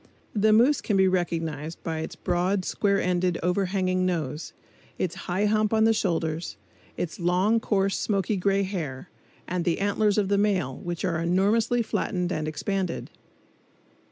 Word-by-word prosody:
The 215 0 +3
moose 245 +6 +4
can 205 - 0
be 190 0 +5
recognized 165 -4 -2
by 160 -1 -3
its 160 - -5
broad, 180 +1 0
square 200 -1 +1
ended, 180 -1 +1
overhanging 185 0 +1
nose, 160 -4 -2 0.5
its 175 -2 -1 0.2
high 190 +4 +1
hump 215 +1 +2
on 220 - +4
the 225 0 +5
shoulders, 165 - -1 0.4
its 175 - -4
long, 180 +6 +2
coarse, 195 -3 0
smoky 200 0 0
gray 195 +1 +1
hair, 170 -6 -5 0.4
and 180 -1 -1
the 170 -2 +1
antlers 205 +1 +1
of 205 -2 +2
the 200 0 +2
male, 185 -11 +1
which 175 -1 -4
are 165 -2 0
enormously 215 +7 +2
flattened 180 -4 -1
and 155 -2 -2
expanded. 185 +3 -3
185 Hz, 155 wpm, -26 LUFS, 170-205 Hz, 0.5 s, be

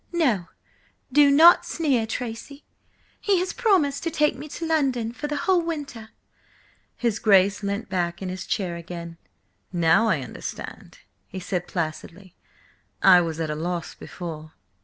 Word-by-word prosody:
"No, 240 - +1 0.6
do 290 +1 +6
not 320 +5 +7
sneer, 270 -9 0
Tracy! 245 +5 -6 0.6
He 400 -2 +2
has 365 +1 -1
promised 330 - +2
to 335 - -2
take 300 -2 +1
me 305 - -8
to 330 - -5
London 270 -8 0
for 295 +5 -5
the 295 - -3
whole 370 -2 +3
winter–" 285 -9 -6 0.9
His 235 -3 -1
Grace 200 -2 +4
leant 200 +2 -3
back 175 -2 -2
in 190 - -5
his 185 0 -6
chair 185 -5 -2
again. 170 -1 -8 0.5
"Now 175 +5 +3
I 165 -10 +1
understand," - - -8 0.3
he 190 - -7
said 180 -1 -3
placidly. 170 +3 -5 0.7
"I 180 -2 +8
was 165 -1 -3
at 160 -2 -2
a - - -3
loss 170 +2 -4
before." 160 -3 -8
210 Hz, 150 wpm, -24 LUFS, 175-290 Hz, 0.9 s, I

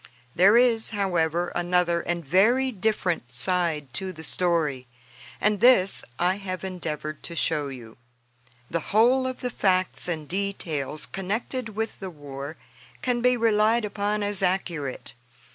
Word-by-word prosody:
There 195 +6 +6
is, 235 -2 +3
however, 175 -5 0
another 175 -1 +1
and 170 -2 -3
very 235 - +3
different 185 - -1
side 150 0 +1
to 190 +4 -3
the 160 -3 -10
story, 155 -7 0 0.5
and 210 -1 +1
this 235 -7 +5
I 180 +2 +1
have 185 -3 -5
endeavored 155 -5 -5
to 170 - -7
show 155 -3 0
you. 120 -5 -10 0.7
The 170 - -1 0.2
whole 255 +4 +4
of 255 -1 -5
the 250 - -2
facts 185 -4 +1
and 160 -4 -3
details 165 -7 -2
connected 220 +4 -4
with 225 +1 -3
the 190 - -5
war 145 -2 -8 0.5
can 245 -2 0
be 250 0 +3
relied 225 0 +3
upon 205 0 -1
as 205 -1 -1
accurate. 175 -7 -2
185 Hz, 140 wpm, -25 LUFS, 160-210 Hz, 0.7 s, There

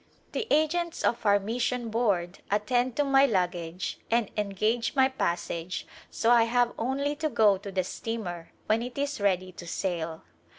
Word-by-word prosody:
The 455 - -3
agents 325 +3 +1
of 230 -2 +1
our 205 0 +6
mission 235 +3 -2
board 200 -6 0
attend 245 +4 +1
to 290 - +2
my 275 0 +5
lug 185 -6 +2
gage 170 +1 -5
and 230 -3 +1
engage 215 +4 0
my 265 -1 +5
passage 170 -6 -2 0.2
so 230 - +1
I 235 -1 +6
have 245 +1 +2
only 275 +5 -1
to 310 0 -1
go 210 -7 +4
to 200 0 -7
the 185 -1 0
steamer 180 -5 -5 0.2
when 220 +2 +2
it 245 +2 -6
is 285 -4 -2
ready 185 -2 +1
to 175 -1 -10
sail. 165 -3 -3
225 Hz, 170 wpm, -28 LUFS, 185-250 Hz, 0.2 s, our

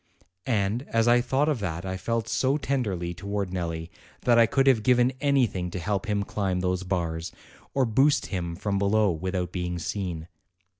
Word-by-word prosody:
And 110 -1 +1
as 115 0 +1
I 120 0 +5
thought 135 +4 +1
of 150 -6 +1
that 90 -3 -3
I 95 0 -3
felt 115 +4 -2
so 135 +2 +1
tenderly 105 - -2
towards 100 +1 -3
Nelli 85 -2 -3 0.3
that 120 -1 +4
I 115 - +6
could 135 +3 +2
have 130 -5 +4
given 125 +2 +3
anything 125 -11 +1
to 90 - -5
help 100 +3 -2
him 105 -1 0
climb 95 -3 -1
those 90 0 0
bars, 85 -3 -2 0.4
or 135 -2 +3
boost 135 +4 +3
him 85 -3 -3
from 100 +2 -1
below 100 0 +3
without 90 +1 -3
being 90 -1 -3
seen. 85 -2 -4
100 Hz, 180 wpm, -26 LUFS, 90-120 Hz, 0.4 s, I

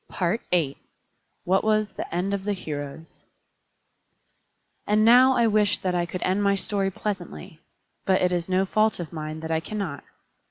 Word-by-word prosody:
PART 180 +5 -1
VI 155 -6 +1 0.7
What 190 +2 +2
Was 215 -1 +1
the - - -6
End 180 +3 -1
of 200 -1 -2
the 205 +1 -1
Heroes 150 -3 -7 1.6
And 215 +1 +3
now 250 +3 +7
I 235 - +3
wish 215 -2 +3
that 185 -1 0
I 175 -1 0
could 180 - -5
end 190 +2 +1
my 200 -1 +3
story 195 0 0
pleasantly; 185 -5 -6 0.4
but 190 -1 +2
it 180 - +1
is 175 0 -2
no 185 +1 +2
fault 215 +2 +1
of 170 -1 -6
mine 155 0 -5
that 160 0 -5
I 160 - +2
cannot. 175 -5 -5
190 Hz, 170 wpm, -25 LUFS, 170-210 Hz, 1.6 s, now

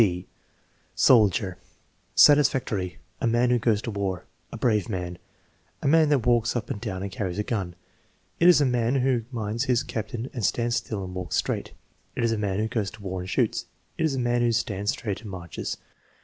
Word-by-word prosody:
(eZ) 90 -3 -1 0.7
Soldier 100 -5 +4 0.6
Satisfactory. 125 -11 +4 0.2
"A 125 - +1
man 120 +2 +3
who 120 - +3
goes 110 -2 +1
to 115 - -3
war." 100 -3 -3 0.3
"A - - -6
brave 110 -3 +1
man." 90 -3 -4 0.6
"A - - +1
man 155 +1 +5
that 140 -6 +2
walks 120 -1 +2
up 115 -3 -3
and 105 - -4
down 95 -5 -4
and 100 - -4
carries 95 -6 -3
a 105 - 0
gun." 95 -6 -3 0.6
"It 170 - +5
is 180 - +7
a 145 - +3
man 125 0 +1
who 130 -3 +1
minds 115 +1 -2
his 125 -1 +2
captain 115 +3 -5
and 120 - -4
stands 120 +4 +1
still 105 -4 -4
and 90 -1 -7
walks 90 -2 -4
straight," - - -1 0.4
"It 120 - -1
is 115 - +2
a 115 - 0
man 100 -2 -1
who 110 +1 0
goes 110 -4 -1
to 110 +1 -14
war 95 -1 -3
and 90 +1 -6
shoots." 90 - 0 0.3
"It 160 - 0
is 150 -4 0
a - - -2
man 120 0 +1
who 120 -1 +3
stands 105 -3 -1
straight 105 -4 -2
and 110 - -9
marches." 90 -4 -5
110 Hz, 205 wpm, -26 LUFS, 95-120 Hz, 0.7 s, is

